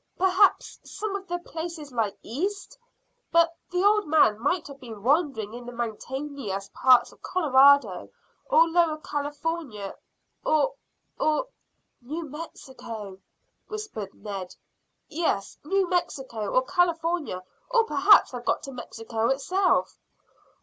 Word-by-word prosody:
"Perhaps 380 +2 +3
some 425 -2 -4
of 390 -1 -6
the 350 0 -2
places 330 -3 -7
lie 225 -4 0
east; 395 - -3 0.6
but 335 0 +4
the 360 +1 0
old 420 -1 +4
man 295 -9 +4
might 315 +7 0
have 280 -1 -11
been 225 -6 -10
wandering 265 -6 +1
in 245 +1 -8
the 245 - -8
mountainous 235 -3 -5
parts 255 -2 +5
of - - -21
Colorado 280 - +4 0.4
or 330 -9 +6
Lower 330 -2 +2
California, 290 -7 -4 0.5
or 310 +12 +2 0.5
or 310 +11 +1 0.3
" - - -49
"New 325 0 -3
Mexico," 235 - -8 0.5
whispered 425 - -6
Ned. 195 -3 -7 0.5
"Yes, 310 -11 -2
New 385 +5 +1
Mexico, 265 - -2
or 255 - +3
California, 335 - 0 0.3
or 480 -2 +4
perhaps 405 -2 +5
have 245 -2 -6
got - - 0
to 275 - -7
Mexico 225 -2 -3
itself." 360 +9 +1
290 Hz, 125 wpm, -26 LUFS, 235-350 Hz, 0.6 s, or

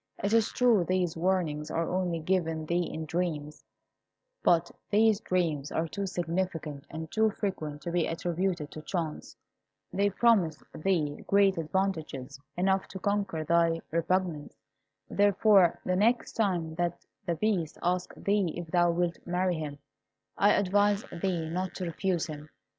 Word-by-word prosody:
It 200 +2 +1
is 225 -1 +3
true 235 -7 +4
these 180 -1 0
warnings 165 -4 0
are 165 0 -1
only 180 -2 0
given 165 -2 -1
thee 170 +2 0
in 160 - -4
dreams; 155 -2 -3 0.8
but 170 0 +3 0.2
these 215 0 +4
dreams 165 -8 -1
are 165 +1 0
too 200 +4 -4
significant 170 -5 -3
and 160 0 -7
too 220 0 +3
frequent 155 -8 -4
to 170 - -3
be 175 -1 +1
attributed 170 -1 -2
to 155 - -8
chance. 160 -2 -4 0.6
They 200 +2 +2
promise 200 -7 +2
thee 155 -4 -1
great 195 -3 +4
advantages, 155 -6 -2 0.2
enough 190 +1 +1
to 190 - -8
conquer 200 -5 -1
thy 165 +1 +3
repugnance. 170 -2 -1 0.5
Therefore, 200 -2 +4
the 185 - +1
next 230 +5 +2
time 180 -7 0
that 175 0 -1 0.2
the 170 - +1
Beast 185 -5 0
asks 180 +1 -1
thee 200 -4 0
if 175 -2 -6
thou 175 -1 +4
wilt 170 0 0
marry 180 -1 0
him, 145 -2 -5 0.6
I 205 +1 +4
advise 205 +1 +2 0.2
thee 175 -4 0
not 185 +3 -3
to 185 - -3
refuse 175 0 -1
him. 150 -1 -8
175 Hz, 145 wpm, -29 LUFS, 160-195 Hz, 0.8 s, true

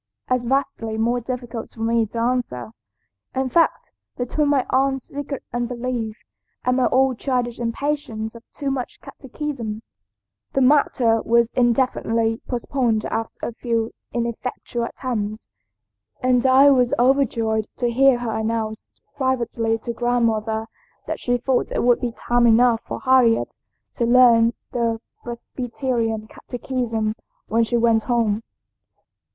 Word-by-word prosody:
as 255 -1 +1
vastly 235 -4 -1
more 235 +2 +1
difficult 240 -1 -5
for 225 - -12
me 230 0 +2
to 230 - -8
answer. 230 - -1 0.6
In 260 0 0
fact, 330 +6 +2 0.3
between 275 +4 0
my 280 -3 +2
aunt's 270 0 +1
secret 285 -1 -6
unbelief 240 -2 -3 0.5
and 250 0 +2
my 255 - +3
own 260 -1 +3
childish 245 -3 -1
impatience 230 -2 -2
of 230 - -11
too 280 -1 -3
much 260 -2 -4
catechism, 250 -6 -6 0.7
the 270 - +2
matter 255 -4 +3
was 235 0 +3
indefinitely 230 -2 +1
postponed 240 -3 0
after 225 0 -3
a 235 - -5
few 230 -1 -1 0.2
ineffectual 235 0 -3
attempts, 220 -4 -4 0.7
and 250 0 +3
I 270 +2 +7
was 250 -2 +3
overjoyed 230 -4 +2
to 240 -2 0
hear 265 +1 +5
her 240 -2 -3
announce 220 0 -2 0.3
privately 235 -4 0
to 235 +1 -5
grandmother 225 -2 0 0.4
that - - -4
she 245 0 +1
thought 250 +1 0
it - - 0
would 245 0 +4
be 245 - -1
time 240 0 +2
enough 230 0 +5
for - - -5
Harriet 255 -3 +3 0.4
to 235 - 0
learn 235 -2 +6 0.2
the 230 -2 0 0.2
Presbyterian 235 -2 -3
catechism 235 -3 -3 0.4
when 230 +1 +3
she 240 +1 0
went 230 -1 +3
home." 225 -3 +1
240 Hz, 130 wpm, -22 LUFS, 225-255 Hz, 0.7 s, I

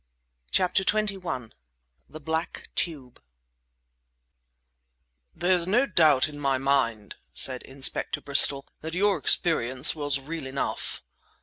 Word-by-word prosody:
CHAPTER 185 +1 +1
XXI 190 - -1 0.6
THE 155 - -10
BLACK 160 +2 -4
TUBE 140 -8 -3 2.1
"There's 175 -1 +1
no 240 +8 +2
doubt 155 - +3
in 145 -1 -10
my 135 -2 0
mind," 130 -6 -1 0.2
said 130 -2 +2
Inspector 135 0 -2
Bristol, 140 0 +4
"that 160 +2 -7
your 200 -1 +1
experience 130 -4 +4
was 145 -3 -2
real 150 0 -7
enough." 135 +1 -4
150 Hz, 105 wpm, -25 LUFS, 135-175 Hz, 2.1 s, Bristol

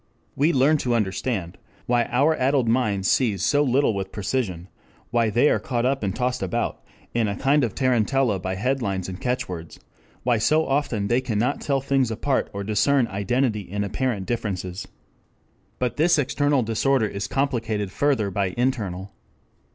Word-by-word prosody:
We 150 +5 +3
learn 145 +1 +4
to 125 -4 0
understand 100 -3 -2 0.3
why 120 -1 +2
our 145 +8 +2
addled 130 -2 +1
minds 110 -5 +1
seize 105 -7 +2
so 145 0 +3
little 135 -3 +2
with 95 -1 -4
precision, 95 -5 -2 0.4
why 115 -2 +2
they 120 +7 +3
are - - +3
caught 120 -2 -2
up 135 +1 +1
and 100 -3 -2
tossed 125 0 -1
about 95 - -2 0.3
in 115 -2 +1
a 100 - -2
kind 140 +1 +2
of 115 -5 -2
tarantella 130 -3 +1
by 95 +1 -3
headlines 100 -4 -1
and 95 0 -7
catch 125 0 -1
words, 85 -3 -8 0.4
why 120 -2 +2
so 155 +8 +3
often 135 -7 0
they 120 +3 +2
cannot 125 +1 -1
tell 135 -2 0
things 135 -2 +1
apart 130 +5 -1
or 100 0 -5
discern 110 +6 +2
identity 110 +3 0
in 100 +2 -4
apparent 105 -1 -2
differences. 95 -5 -3
5 - - -24 0.9
But 125 -1 -2
this 165 +2 +4
external 145 -1 +1
disorder 115 +2 +1
is 100 -1 -4
complicated 115 -7 -1
further 120 -6 +1
by 95 -1 -1
internal. 100 -7 -1
120 Hz, 165 wpm, -24 LUFS, 100-135 Hz, 0.9 s, learn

